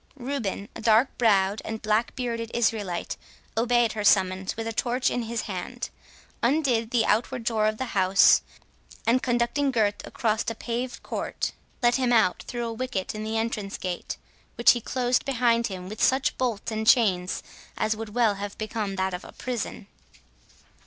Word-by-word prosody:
Reuben, 240 -7 -3
a - - -7
dark 225 +3 +4
brow'd 200 -3 +3
and 220 0 -4
black 215 +2 +1
bearded 230 -2 -3
Israelite, 215 -6 -1 0.4
obeyed 240 0 +3
her 215 -1 -3
summons, 190 0 +3
with 225 - -3
a 225 - -3
torch 250 +3 +1
in 245 - -1
his 230 -1 -3
hand; 210 +5 -5 0.5
undid 245 -4 +2
the 230 -2 +2
outward 235 +3 +1
door 220 -2 +1
of 215 0 -1
the 260 - -2
house, 190 0 +5 0.6
and 240 +3 +3
conducting 245 +3 +1
Gurth 215 -5 +1
across 220 -1 -1
a 230 - -4
paved 245 +2 -4
court, - - -3 0.3
let 240 +1 +4
him 255 -2 +1
out 220 -6 +3
through 240 -1 -3
a 230 - -3
wicket 225 -5 -3
in 215 0 -5
the 220 +1 -2
entrance 220 -3 -2
gate, 180 -2 -4 0.4
which 235 - +7
he 240 - -1
closed 245 +1 0
behind 235 -3 +2
him 185 -3 -7
with 215 +3 -7
such 265 +1 +3
bolts 235 -4 -2
and 220 0 -2
chains 185 -7 +3 0.3
as 215 0 +1
would 220 0 -6
well 230 -4 +4
have 200 0 -6
become 215 -2 -3
that 190 0 -1
of 180 - -5
a - - -12
prison. 245 -5 -4
225 Hz, 175 wpm, -26 LUFS, 210-240 Hz, 0.6 s, which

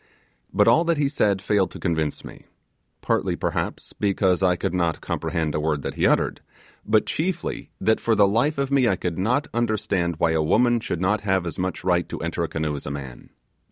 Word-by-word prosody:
But - - +3
all 165 - +5
that 165 -1 +1
he 145 -1 +2
said 100 -9 +1
failed 100 -4 +2
to - - -10
convince 80 -3 -2
me: - - -12 0.5
partly, - - 0
perhaps, - - -3
because 95 -3 +1
I 90 -1 +3
could 85 - -3
not 85 -3 0
comprehend 80 -3 -2
a - - 0
word 75 -2 -1
that - - -3
he - - +2
uttered; - - +1 0.4
but 110 0 +2
chiefly, 175 +2 -3
that 110 - +2
for 115 - +1
the 100 -1 +5
life 120 +10 +1
of 140 0 -1
me 135 -3 +4
I 95 - +3
could 90 -1 -4
not 125 +9 +1
understand 110 -7 0
why 80 0 +2
a 80 -1 +1
woman 120 +8 +3
would 85 - -1
not 100 +3 +1
have 95 -3 0
as 85 - -5
much 90 0 -3
right 90 -2 +1
to - - -5
enter 85 +1 -2
a - - 0
canoe 75 -2 -2
as 70 - -7
a - - -2
man. 65 -4 -8
95 Hz, 215 wpm, -24 LUFS, 85-110 Hz, 0.5 s, all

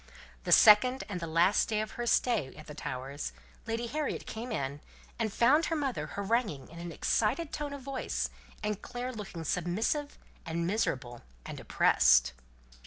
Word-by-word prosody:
The - - -1
second 250 +4 +7
and 200 -4 -4
the 170 - -4
last 170 +7 +3
day 215 -1 +1
of 215 - -3
her 240 0 -4
stay 225 - +1
at 155 - -11
the 150 - -9
Towers, 140 0 -5 0.3
Lady 230 +1 -2
Harriet 300 +4 -3
came 230 +2 -6
in, 140 -6 -3 0.4
and 220 -2 0
found 270 +10 +4
her 325 - 0
mother 275 -5 -2
haranguing 200 - -1
in 170 - -11
an 170 0 -6
excited 255 - 0
tone 295 -1 -3
of 280 -2 -7
voice, 270 -1 -3 0.3
and 210 -1 -2
Clare 245 +1 -5
looking 195 -7 -7
submissive 190 - -1 0.3
and 170 0 -2
miserable 130 - -1 0.2
and - - -7
oppressed. - - +4
210 Hz, 165 wpm, -30 LUFS, 165-250 Hz, 0.4 s, second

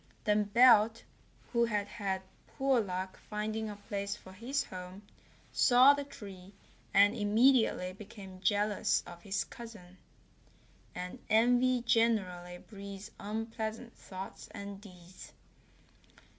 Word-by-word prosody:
Then 210 0 +2
Belt, 230 0 +5 0.5
who 235 -1 +4
had 210 -3 -1
had 195 -4 -3 0.2
poor 270 -2 +1
luck 185 -1 -4
finding 215 +1 -2
a 210 - -6
place 200 0 -4
for 190 - -14
his 260 +8 -2
home, 185 0 -9 0.5
saw 255 +3 +7
the 285 0 -3
tree, 195 -8 -11 0.4
and 200 +1 +6
immediately 220 -3 +3
became 195 -2 -11
jealous 205 +1 +1
of 175 0 -11
his 195 0 -1
cousin. 200 -6 -12 1.0
And 180 +7 -6
envy 245 +3 +4
generally 185 -7 +1
breeds 200 +1 -10
unpleasant 220 +2 -4
thoughts 190 0 -9
and 200 0 -7
deeds. 180 -3 -13
205 Hz, 115 wpm, -32 LUFS, 190-230 Hz, 1.0 s, saw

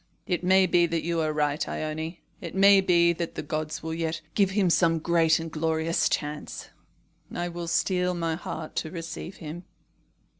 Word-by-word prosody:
"It 180 -1 -1
may 190 +1 +5
be 175 -1 +3
that 165 0 -2
you 170 -1 0
are 155 -1 0
right, 150 -1 0
Ione. 160 +2 -4 0.2
It 170 0 -7
may 195 0 +7
be 170 -2 +4
that 170 0 -5
the - - -4
gods 155 +1 -4
will 160 0 -3
yet 165 0 -2
give 200 -2 +3
him 190 -2 +2
some 165 -1 +3
great 165 0 +3
and 165 0 -6
glorious 160 +1 0
chance. 150 0 -4 0.6
I 175 0 -3
will 170 0 -6
steel 180 +2 +1
my 165 -1 -1
heart 160 -1 -6
to 160 - -1
receive 165 +2 -7
him." 165 +1 -8
165 Hz, 180 wpm, -27 LUFS, 160-175 Hz, 0.6 s, may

